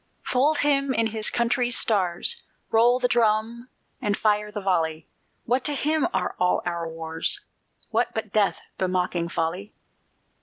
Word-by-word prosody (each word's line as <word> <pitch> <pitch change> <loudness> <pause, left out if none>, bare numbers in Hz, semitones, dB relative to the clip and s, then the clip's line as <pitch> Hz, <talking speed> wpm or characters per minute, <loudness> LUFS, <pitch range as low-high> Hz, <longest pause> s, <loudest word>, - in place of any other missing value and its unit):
Fold 285 +5 +2
him 280 -2 +1
in 230 - +3
his 215 -1 +1
country's 240 +1 +1
stars, 200 - +1 0.3
Roll 235 +2 +4
the 250 - +2
drum 235 +1 0 0.3
and 205 -1 0
fire 210 -1 +1
the 210 - -4
volley! 165 -5 -1 0.4
What 250 +2 +1
to 295 - +1
him 305 +2 +1
are - - -1
all 180 0 +1
our 170 -1 -3
wars, 160 0 0 0.5
What 230 +1 +1
but 220 -2 -4
death 210 -2 +1 0.2
bemocking 180 -2 -1
folly? 175 +6 -3
215 Hz, 145 wpm, -24 LUFS, 180-245 Hz, 0.5 s, Roll